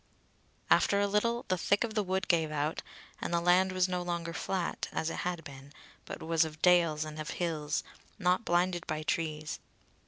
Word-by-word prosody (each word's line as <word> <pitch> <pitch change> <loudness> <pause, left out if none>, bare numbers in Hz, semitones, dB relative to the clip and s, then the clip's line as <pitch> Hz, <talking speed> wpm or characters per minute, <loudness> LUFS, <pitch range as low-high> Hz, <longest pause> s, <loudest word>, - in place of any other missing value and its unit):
After 200 - +5
a 205 - +3
little 230 +4 +1
the 185 -1 0
thick 200 +4 +2
of 230 -2 -3
the 215 - +1
wood 190 +1 -1
gave 165 -3 +2
out, 150 +1 -1 0.4
and - - -3
the 170 - +2
land 180 +2 +4
was 185 -1 +2
no 180 -1 -2
longer 170 -1 -3
flat, 180 +1 -2
as 160 - -1
it - - -5
had 175 -2 -3
been, 140 0 -11 0.3
but - - -7
was 165 0 +3
of 155 -1 -6
dales 170 -4 +4
and 155 0 -7
of 155 - -4
hills, 155 -4 -1 0.3
not 180 +1 +2
blinded 175 -2 +1
by 155 -1 -2
trees. 155 -1 -2
175 Hz, 190 wpm, -31 LUFS, 155-185 Hz, 0.4 s, After